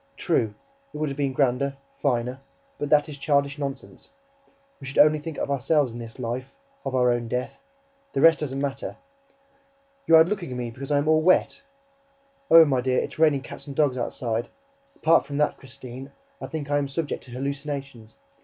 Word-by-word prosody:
True, 105 -2 0 0.4
it - - -8
would 155 -1 -1
have 135 - -5
been 140 -2 +1
grander, 135 +1 0 0.2
finer... 125 -1 0 0.4
But 145 - -3
that 150 0 +4
is 145 -2 -8
childish 140 0 +1
nonsense... 140 -1 -6 0.7
We 135 - -9
should 135 - -6
only 155 +1 +6
think 155 0 -7
of 140 - -2
ourselves 140 -1 +1
in 120 - -7
this 115 -1 -9
life, 125 +1 -5 0.3
of 135 -1 -3
our 125 -1 +4
own 120 -1 -1
death... 125 +2 -3 0.5
the 135 - 0
rest 165 -1 +6
doesn't 135 -3 -3
matter... 140 -1 -4 1.1
YOU'RE 160 0 +8
LOOKING 190 -4 -3
AT 125 - -5
ME 120 -1 -4
BECAUSE 135 +3 -8
I 145 - +3
AM 145 +1 0
ALL 155 0 +4
WET?... 185 - +3 0.9
Oh, 165 -1 +9
my 135 -4 +1
dear, 130 0 0
it's - - -3
raining 155 -4 +4
cats 140 +1 -10
and 140 - -7
dogs 145 -4 +2
outside!... 120 -1 -3 0.5
Apart 165 +1 +3
from 140 - -4
that, 150 - +1
Christine, 130 +1 -10 0.3
I - - -5
think 150 -3 -5
I 145 - +3
am 140 - -2
subject 145 +2 -3
to - - -15
hallucinations... 140 -4 -5
140 Hz, 190 wpm, -25 LUFS, 125-150 Hz, 1.1 s, Oh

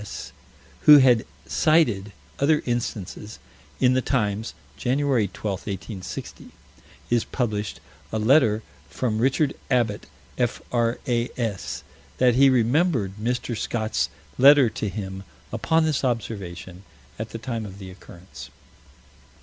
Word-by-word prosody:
S., 105 - -8 0.6
who 150 -1 +11
had 125 - +4 0.2
cited 120 -11 +2 0.3
other 150 +2 +3
instances. 110 -3 -4 0.4
In 125 0 +4
the 130 - +2
Times, 110 -4 -1 0.2
Jan. 130 +1 0
12, 130 -9 +1
1860, 100 -1 -5 0.6
is 120 -1 +3
published 105 -5 -3 0.3
a 110 - -1
letter 110 -2 +3 0.3
from 110 -4 -2
Richard 135 +4 +2 0.2
Abbott, 120 -5 0 0.3
F.R.A.S.: 120 -3 -2 0.3
that 125 -1 +4
he 135 +3 +6
remembered 130 - +2
Mr. 125 +1 -2
Scott's 110 0 -1 0.3
letter 135 -3 +7
to 105 - -3
him 95 -1 -6 0.3
upon 160 0 +2
this 155 -3 0
observation, 95 -7 -4 0.4
at 110 0 -4
the - - -6
time 115 -1 -4
of 100 -2 -9
the 95 -2 -9
occurrence. 90 -1 -12
115 Hz, 115 wpm, -24 LUFS, 105-130 Hz, 0.6 s, who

